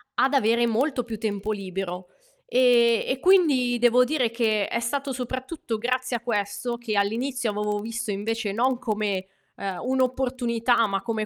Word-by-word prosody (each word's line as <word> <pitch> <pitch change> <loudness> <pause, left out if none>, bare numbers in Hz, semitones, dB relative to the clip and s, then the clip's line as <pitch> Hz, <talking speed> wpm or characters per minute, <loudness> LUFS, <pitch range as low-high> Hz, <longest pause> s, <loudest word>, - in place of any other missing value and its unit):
ad 270 - +2
avere 235 -2 +3
molto 250 +3 0
più 225 -2 -5
tempo 210 -1 -3
libero 185 -2 -5 0.4
e 240 -2 +4
e 260 - -1
quindi 290 -10 +4
devo 245 +1 +5
dire 255 -2 0
che 220 -3 +1
è 235 - -1
stato 275 +3 -2
soprattutto 255 0 -4
grazie 250 +2 -1
a - - -10
questo, 235 +1 -2
che 230 -3 -3
all'inizio 235 +4 0
avevo 210 0 -2
visto 225 0 -4
invece 210 +1 -2
non 250 +5 +1
come, 210 -5 -2 0.3
ehm, 195 -2 -4
un'opportunità, 250 -2 +1
ma 195 -1 -2
come 220 -2 -2
235 Hz, 155 wpm, -25 LUFS, 210-255 Hz, 0.4 s, devo